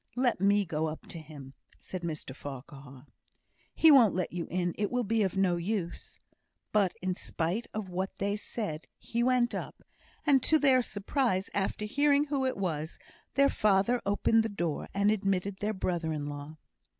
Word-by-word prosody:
"Let 245 -6 +1
me 200 +1 +4
go 160 -1 -1
up 155 0 -6
to 165 - -6
him," 145 -4 -11 0.3
said 185 - -6
Mr 155 -5 -5
Farquhar. 135 -1 -10 0.7
"He 320 - +7
won't 240 - +7
let 180 -2 -2
you 175 -1 -3
in. 175 -1 -1
It 205 -1 -1
will 250 0 0
be 225 +1 +1
of 190 -1 0
no 185 -3 +3
use." 175 -1 -4 0.5
But 200 -4 +2
in 185 0 0
spite 180 +5 -3
of 215 -2 -4
what 185 +1 -4
they 200 +1 0
said, 205 -6 -4
he 235 - -3
went 245 -1 +2
up; - - -6 0.4
and 280 -3 +5
to 315 - +4
their 270 -4 +5
surprise, 205 -2 -1
after 205 +1 -1
hearing 285 +5 +3
who 280 -3 -1
it 260 - -2
was, 160 -5 -3 0.4
their 280 0 +5
father 210 +1 +2
opened 205 +3 +3
the 225 - -2
door, 170 -7 -3
and 200 +1 +2
admitted 195 -2 0
their 210 +1 0
brother 175 -4 -1
in 150 -2 -3
law. 145 +1 -7
195 Hz, 175 wpm, -30 LUFS, 170-225 Hz, 0.7 s, He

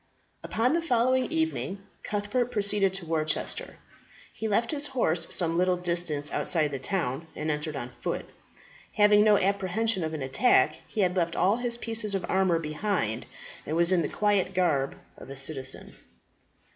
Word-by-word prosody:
Upon 245 +5 +1
the 335 - +1
following 255 -3 +2
evening 320 -12 -2 0.2
Cuthbert 210 +4 -1
proceeded 205 -3 +2
to 190 -3 -6
Worcester. 155 -1 -2 0.6
He 220 - -4
left 225 +3 +1
his 295 -1 -1
horse 170 - +1
some 170 -1 +2
little 180 0 +2
distance 170 -4 -1
outside 155 -4 +1
the 135 - -4
town, 160 -2 -2
and 155 +1 -2
entered 150 0 -3
on 125 -2 -5
foot. - - -3 0.7
Having 210 0 +5
no 210 -1 +5
apprehension 200 +1 0
of 160 0 -3
an 145 - -4
attack, 135 +2 +3
he 215 - -2
had 180 -1 +1
left 170 -2 0
all 195 +5 +3
his 240 -1 -2
pieces 225 -3 -1
of 190 - -2
armour 190 -3 +2
behind, 155 - -2 0.4
and 155 - -3
was 170 +1 +5
in 180 -2 +3
the - - -2
quiet 200 -3 +1
garb 155 -7 +1 0.2
of - - -11
a 135 - -7
citizen. 135 -1 -4
185 Hz, 165 wpm, -27 LUFS, 155-210 Hz, 0.7 s, Having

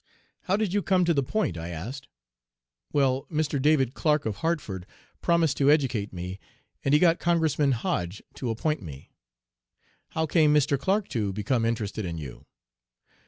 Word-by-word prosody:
"'How 190 +2 +2
did 210 -4 -1
you 205 - +2
come 185 -2 +2
to 170 - +3
"the 140 - +2
Point?"' 125 - -1
I 85 +1 -5
asked. 115 - -6 0.8
"'Well, 135 -2 +1
Mr. 150 -3 0
David 135 -4 +3
Clark, 150 -1 +1
of 110 -3 -2
Hartford, 125 - -2 0.3
promised 170 -4 +2
to 140 0 +4
educate 130 -9 +2
me, 90 +2 -6 0.4
and 140 +1 +3
he - - +5
got 170 0 +4
Congressman 160 -5 +2
Hoge 95 -5 -2
to 125 - -4
appoint 150 +6 -1
me.' 75 -6 -10 1.0
"'How 160 - -1
came 155 -1 +4
Mr. 145 -1 +3
Clark 195 +7 +1
to 105 -4 -1
become 110 +4 0
interested 110 -2 -2
in 85 -3 -4
you?' 70 -5 -9
135 Hz, 165 wpm, -27 LUFS, 105-160 Hz, 1.0 s, he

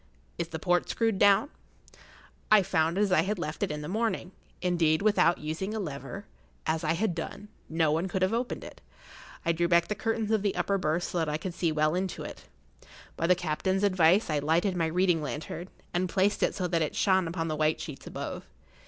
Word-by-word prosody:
Is 170 - -1
the 160 - -5
port 175 +2 +1
screwed 225 -4 0
down?" 205 +8 +5 1.0
I 215 -2 +7
found 165 -1 +1
it - - +2
as 205 -2 +2
I 180 - +5
had 200 +4 -1
left 150 -2 -4
it - - +1
in 150 0 -4
the - - -5
morning. 220 -2 -1 0.3
Indeed, 170 -2 +2
without 205 -5 +4
using 160 +8 -4
a - - -2
lever, 155 +3 -6 0.4
as 160 +1 0
I 160 - +2
had 180 +2 0
done, 200 +5 -6 0.2
no 160 -1 +2
one 165 +4 0
could 185 0 -1
have 190 +4 +2
opened 240 +2 -2
it. - - -11 0.6
I 170 - +3
drew 170 +1 +1
back 170 0 +3
the - - +1
curtains 225 0 -1
of 220 -2 +2
the 200 -1 0
upper 200 0 0
berth 170 +1 0
so 175 - -2
that 160 -2 0
I 150 - -1
could 175 +2 -5
see 170 -1 0
well 155 0 +2
into 185 +1 -2
it. - - -9 0.7
By 165 - 0
the 180 - +5
captain's 180 +3 -1
advice 185 0 +4
I 150 -2 0
lighted 165 +6 +1
my 165 -2 +1
reading 175 0 +2
lantern, 155 +4 -5 0.2
and 180 +1 0
placed 195 +3 +1
it - - +1
so 185 -3 -1
that 170 -1 0
it 155 - -1
shone 190 -3 +3
upon 165 0 -2
the 155 - -1
white 155 +1 +1
sheets 145 -4 -8
above. - - -6
175 Hz, 220 wpm, -29 LUFS, 160-195 Hz, 1.0 s, I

